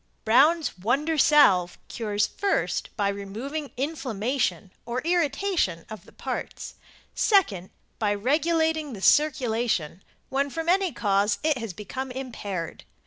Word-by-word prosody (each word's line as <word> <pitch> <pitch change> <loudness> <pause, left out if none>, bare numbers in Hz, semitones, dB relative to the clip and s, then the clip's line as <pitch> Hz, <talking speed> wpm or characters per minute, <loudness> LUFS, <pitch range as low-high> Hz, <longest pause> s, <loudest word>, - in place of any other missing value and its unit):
Brown's 285 - +3
Wonder 275 - 0
Salve 205 - +5
cures 210 -2 -1
first 400 0 -1
by 205 -2 +1
removing 225 +10 -5
inflammation 255 - -2
or 240 +2 -3
irritation 335 - 0
of 215 - -9
the - - -17
parts; - - -6 0.4
second 210 - +2 0.3
by 205 -2 +1
regulating 315 +5 +1
the 200 - -8
circulation 230 - +2 0.3
when 275 +1 0
from 325 +3 -3
any 375 0 +3
cause 205 -2 +1
it 305 -4 +1
has 225 -5 -5
become 255 +8 -6
impaired. 220 -10 -5
255 Hz, 120 wpm, -26 LUFS, 205-310 Hz, 0.4 s, Salve